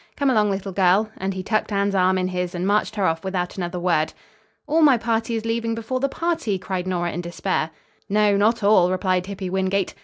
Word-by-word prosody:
Come 280 -2 +2
along, 210 -3 +3
little 195 0 -3
girl," 195 +3 +2
and 190 +1 -2
he 185 - -4
tucked 215 +2 -1
Anne's 200 0 +1
arm 185 0 +3
in 185 0 0
his 180 -1 -3
and 175 +1 -2
marched 210 +2 +1
her 200 -3 0
off 160 -2 0
without 185 -2 -3
another 180 -1 -4
word. 170 -3 +1 0.5
"All 315 +2 +2
my 285 -5 +6
party 230 0 -1
is 225 0 -3
leaving 230 0 -1
before 230 +3 -3
the 275 +1 0
party," 330 - -1
cried 185 0 -4
Nora 175 -2 -1
in 175 - -4
despair. 175 -1 -2 0.4
"No, 210 0 +3
not 220 +2 +2
all," 200 -3 +5
replied 185 0 0
Hippy 190 -2 -5
Wingate. 190 0 0
195 Hz, 215 wpm, -22 LUFS, 185-220 Hz, 0.5 s, my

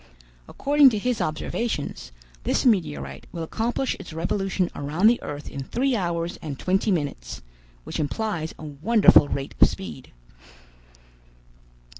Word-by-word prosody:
According 285 -1 +5
to 220 - -2
his 245 +3 -1
observations, 155 - -3 0.3
this - - 0
meteorite 70 - 0
will 170 -2 -5
accomplish 235 +9 -1
its 170 - -9
revolution 185 +2 -1
around 150 +7 -1
the 235 +2 +5
earth 145 0 -6
in 140 - -6
three 255 - 0
hours 170 -3 -2
and 145 -4 -5
twenty 190 +7 +1
minutes, 145 - -2 0.4
which - - -5
implies 165 +1 -2
a - - -11
wonderful 155 +3 +5
rate 140 -1 -4
of - - +8
speed." 190 -9 -8
175 Hz, 130 wpm, -25 LUFS, 145-220 Hz, 0.4 s, of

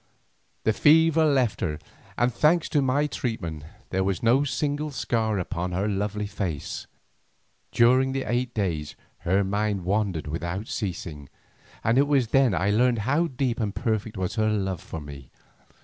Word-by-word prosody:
The 110 - +2
fever 160 +4 +5
left 130 -7 +2
her, 75 -5 -1 0.4
and 120 +1 +2
thanks 155 +7 +3
to 150 - +2
my 135 +2 +2
treatment, 85 - -4 0.3
there 95 0 +1
was 95 +1 -1
no 125 +5 +4
single 145 +3 -1
scar 115 -5 -1
upon 90 0 -3
her 95 +4 0
lovely 105 +1 -2
face. 95 -7 -4 0.8
During 130 +3 +4
eight 125 -1 -1
days 80 -8 -2 0.2
her 95 +3 +1
mind 100 -1 -1
wandered 95 -4 0
without 85 +7 -4
ceasing, 85 - -5 0.5
and 115 +4 +3
it 140 - +4
was 135 -6 +2
then 130 -7 +4
I 95 +3 +1
learned 120 +3 +3
how 150 +7 +2
deep 130 -4 -2
and 105 -3 -2
perfect 110 -3 -2
was 95 -1 -2
her 110 0 +2
love 95 -5 -1
for 80 - -7
me. 70 -3 -10
110 Hz, 155 wpm, -26 LUFS, 95-130 Hz, 0.8 s, fever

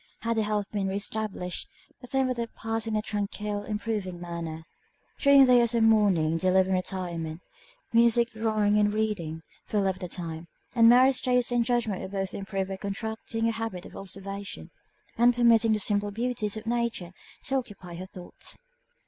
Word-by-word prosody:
Had 230 0 -1
her - - +3
health 210 -1 -1
been 200 -2 -1
re 190 - -2
established, 200 -3 -3 0.3
the 250 - -11
time 265 +1 +1
would 255 -1 -1
have 235 -1 -4
passed 225 0 -3
in 220 - -1
a 215 - 0
tranquil, 210 0 -3
improving 210 -4 -3
manner. 170 -2 -5 0.6
During 280 -1 +7
the 250 - +5
year 240 -1 +6
of 235 -1 +1
mourning 195 -8 +3
they 185 - +2
lived 190 0 +4
in - - +1
retirement; 175 -3 -3 0.5
music, 235 0 +4
drawing, 215 -2 +1
and 205 0 +3
reading, 200 -7 -2 0.2
filled 205 -2 +1
up 190 -1 0
the 180 - -5
time; 170 -1 -5 0.3
and 230 -2 +6
Mary's 255 +2 +5
taste 250 -1 +2
and 240 -1 +3
judgment 230 -5 0
were - - -5
both 195 -1 -3
improved 195 -1 -3
by 195 - -4
contracting 220 +3 -3
a - - +2
habit 225 -5 -4
of - - -12
observation, 195 +1 -7 0.5
and 240 +1 +5
permitting 230 -2 +5
the - - +2
simple 205 0 +1
beauties 220 -1 -2
of 220 - -7
Nature 235 -6 -1 0.3
to 270 - 0
occupy 205 -8 -7
her 185 +2 -7
thoughts. 180 -2 -7
210 Hz, 180 wpm, -27 LUFS, 190-230 Hz, 0.6 s, During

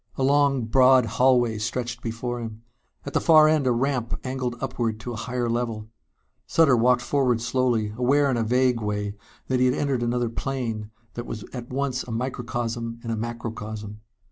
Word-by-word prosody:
A 135 - -1
long 140 -2 +3
broad 130 +2 +5
hallway 120 0 +2
stretched 120 +2 -3
before 120 +1 -4
him. 115 -1 -7 0.4
At 140 - -6
the - - +2
far 155 -2 +7
end 155 -4 +2
a - - +4
ramp 125 -1 -1
angled 130 -2 -3
upward 120 -4 -2
to 120 +1 -5
a - - -5
higher 125 +2 -2
level. 115 -2 -2 0.6
Sutter 160 -6 +4
walked 120 +1 +3
forward 125 -3 +1
slowly, 115 -3 0
aware 140 +4 +3
in - - +1
a 115 - 0
vague 125 +1 +2
way 105 -1 -2 0.3
that 130 -1 0
he 130 - +4
had 125 - +2
entered 140 -4 0
another 120 0 0
plane 115 -5 -3 0.2
that 120 - -6
was 110 -2 -6
at 125 -2 -7
once 130 -1 -1
a - - -9
microcosm 120 -1 -3
and 115 - -3
a - - 0
macrocosm. 110 -2 -6
120 Hz, 180 wpm, -25 LUFS, 115-130 Hz, 0.6 s, far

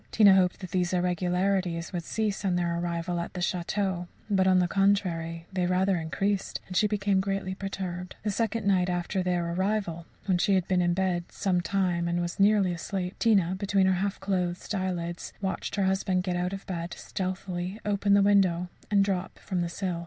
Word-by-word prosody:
Tina 205 -3 +7
hoped 185 -1 +2
that 185 -3 -7
these 180 -1 0
irregularities 180 0 0
would 175 -2 -2
cease 210 +2 -2
on 185 -2 +1
their 170 -1 0
arrival 170 0 -2
at 170 - -5
the - - -3
château, 180 +1 -1 0.2
but, 190 -1 +3
on 185 -1 +5
the 180 -1 +3
contrary, 175 -4 +1
they 180 -1 +1
rather 185 +1 +2
increased, 195 +5 -1
and 185 - -8
she 210 - +4
became 200 -2 +1
greatly 195 -1 -2
perturbed. 190 -2 -5
The 210 - 0
second 225 +1 -1
night 185 -2 +3
after 175 +2 -1
their 175 -2 0
arrival, 185 -3 -1 0.2
when 185 -3 +2
she 195 +3 +3
had 185 -2 +1
been 185 -1 +2
in 175 0 +2
bed 180 -2 0
some 180 -3 0
time 180 -2 0
and 170 0 0
was 175 +1 -3
nearly 200 -2 +4
asleep, 180 +2 -4
Tina, 195 -6 +3
between 195 0 +1
her 190 - +4
half 200 0 -1
closed 185 -1 -2
eyelids, 175 -3 -3
watched 190 -1 -3
her 200 - +1
husband 190 -1 +1
get 180 -1 -1
out 180 +1 -1
of 195 0 -6
bed, 170 -2 -4
stealthily 185 +1 -4
open 200 -1 +2
the 200 - +5
window, 185 -3 +3 0.2
and 200 -1 +4
drop 190 -2 -2
from 185 -3 -3
the 170 - -1
sill. 180 -1 -3
185 Hz, 195 wpm, -28 LUFS, 175-195 Hz, 0.2 s, Tina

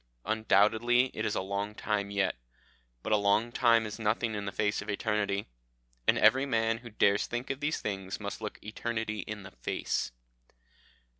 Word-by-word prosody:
Undoubtedly 110 +4 +3
it 110 0 -1
is 105 - -1
a - - 0
long 100 +2 -3
time 105 -2 -1
yet, 100 -1 +1 0.7
but - - 0
a - - +6
long 105 +3 +2
time 115 -2 +4
is 105 +1 -6
nothing 110 +1 0
in 105 -1 -3
the 100 - -3
face 105 0 0
of 105 - -8
eternity, 100 -1 0 0.6
and - - +5
every 135 +2 +5
man 115 -2 +1
who 120 0 -10
dares 100 -1 +2
think 120 +3 -3
of 135 - -4
these 150 +2 -1
things 95 -2 -4
must 100 +1 -5
look 105 - -5
eternity 110 0 -3
in 105 -1 -6
the 95 - -10
face." - - -2
105 Hz, 175 wpm, -30 LUFS, 100-115 Hz, 0.7 s, a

